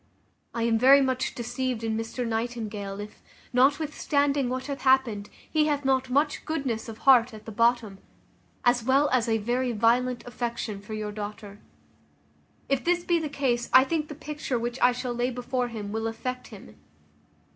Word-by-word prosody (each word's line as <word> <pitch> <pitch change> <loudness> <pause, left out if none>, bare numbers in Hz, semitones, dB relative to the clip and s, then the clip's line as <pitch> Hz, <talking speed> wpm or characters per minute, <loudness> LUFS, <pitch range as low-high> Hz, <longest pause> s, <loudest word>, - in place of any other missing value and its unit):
I 230 - -1
am 230 -1 +2
very 270 +3 +7
much 260 -1 -1
deceived 245 0 -3
in 225 -1 -1
Mr 225 +2 -3
Nightingale, 220 -4 -3
if, 205 +1 -9 0.3
notwithstanding 285 0 +2
what 255 +1 -3
hath 280 -1 -5
happened, 260 -6 +2 0.2
he 310 -1 +2
hath 290 -2 -1
not 265 -1 +1
much 290 +4 +1
goodness 260 -8 -3
of 220 - -8
heart 245 -3 +5
at 215 - -13
the 225 - -7
bottom, 230 -3 +1 0.7
as 240 -1 +3
well 275 +4 +3
as 245 -2 +2
a 225 - +2
very 240 +3 -1
violent 240 +3 +1
affection 235 -4 -4
for 215 +2 -7
your 210 -1 -4
daughter. 205 0 -7 1.1
If 275 -1 0
this 350 0 +1
be 345 -1 +2
the 310 -2 -3
case, 250 -4 -1
I 260 - +9
think 305 +2 -1
the 300 - -8
picture 295 -3 -4
which 240 +2 -3
I 245 - +6
shall 250 0 -4
lay 240 +1 0
before 250 0 -2
him 215 -4 -6
will 225 +1 -2
affect 250 +3 -5
him. - - -13
245 Hz, 175 wpm, -26 LUFS, 225-265 Hz, 1.1 s, I